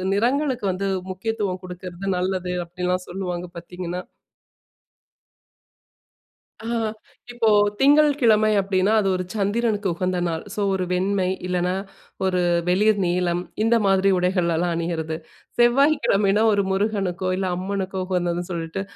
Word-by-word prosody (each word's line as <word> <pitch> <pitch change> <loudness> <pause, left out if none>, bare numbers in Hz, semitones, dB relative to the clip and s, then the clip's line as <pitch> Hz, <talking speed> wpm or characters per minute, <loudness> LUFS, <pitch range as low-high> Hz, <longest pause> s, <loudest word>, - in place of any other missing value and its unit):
நிறங்களுக்கு 250 +2 0
வந்து 195 +2 -2 0.2
முக்கியத்துவம் 195 -1 -3
குடுக்குறது 180 +1 -7
நல்லது 180 0 -1
அப்பிடிலாம் 180 +1 -2
சொல்லுவாங்க. 180 -1 -4
பார்த்தீங்கன்னா. 180 +1 -5 2.6
ஆ - - -5 0.7
இப்போ, 240 -2 +1 0.3
திங்கள்கிழமை 275 -7 +4
அப்பிடின்னா 195 +1 +1
அது 195 - 0
ஒரு 185 - -3
சந்திரனுக்கு 210 0 0
உகந்த 185 +1 -1
நாள். 165 -1 -3
சோ, - - -3
ஒரு 185 -1 -1
வெண்மை 190 +1 +1 0.2
இல்லன்னா, 180 0 0 0.5
ஒரு 185 -1 +1 0.3
வெளிர் 205 +3 +3
நீலம் 175 0 0 0.2
இந்த 225 +1 +3
மாதிரி 195 0 +3
உடைகள் 180 0 +1
எல்லாம் 170 +2 0
அணியிறது. 165 -1 -2 0.4
செவ்வாய்க்கிழமைன்னா 240 -5 +3
ஒரு 200 -1 +2
முருகனுக்கோ! 190 -2 -1
இல்ல 190 0 -1
அம்மனுக்கோ! 190 0 -3
உகந்ததுன்னு 175 -1 -1
சொல்லிட்டு, 170 +2 -3
190 Hz, 115 wpm, -23 LUFS, 180-210 Hz, 2.6 s, திங்கள்கிழமை